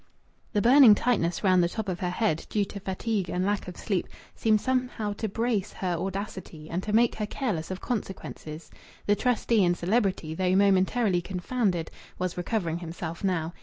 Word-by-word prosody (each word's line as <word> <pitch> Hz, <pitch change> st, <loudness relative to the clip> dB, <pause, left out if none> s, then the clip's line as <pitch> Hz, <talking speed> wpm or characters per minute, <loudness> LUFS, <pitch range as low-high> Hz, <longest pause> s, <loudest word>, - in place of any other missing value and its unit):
The 205 Hz, -, +2 dB
burning 245 Hz, -2 st, +8 dB
tightness 200 Hz, -8 st, 0 dB
round 185 Hz, -2 st, +5 dB
the 170 Hz, -, +1 dB
top 220 Hz, +2 st, -4 dB
of 180 Hz, -2 st, -3 dB
her 180 Hz, -, -1 dB
head, 180 Hz, -3 st, -1 dB
due 205 Hz, -2 st, +1 dB
to 200 Hz, -, -8 dB
fatigue 195 Hz, 0 st, -2 dB
and 180 Hz, +2 st, -1 dB
lack 205 Hz, -1 st, -1 dB
of 180 Hz, -, -8 dB
sleep, 195 Hz, -4 st, -1 dB, 0.3 s
seemed 215 Hz, -1 st, +2 dB
somehow 250 Hz, -4 st, -1 dB
to 215 Hz, +1 st, -3 dB
brace 220 Hz, -1 st, -1 dB
her 185 Hz, -2 st, -2 dB
audacity, 185 Hz, -3 st, -5 dB
and 175 Hz, +2 st, -1 dB
to 210 Hz, -, -4 dB
make 230 Hz, +2 st, +4 dB
her 210 Hz, -1 st, -3 dB
careless 205 Hz, -, -3 dB
of 185 Hz, -1 st, -5 dB
consequences. 190 Hz, -8 st, -5 dB, 0.3 s
The 205 Hz, -, +3 dB
trustee 235 Hz, -2 st, +2 dB
and 175 Hz, 0 st, +2 dB
celebrity, 190 Hz, -4 st, 0 dB
though 185 Hz, +2 st, +1 dB
momentarily 195 Hz, 0 st, +3 dB
confounded, 185 Hz, -1 st, -1 dB, 0.3 s
was 180 Hz, -1 st, -2 dB
recovering 175 Hz, -2 st, -2 dB
himself 170 Hz, 0 st, -6 dB
now. 175 Hz, -4 st, 0 dB
195 Hz, 175 wpm, -27 LUFS, 175-220 Hz, 0.3 s, burning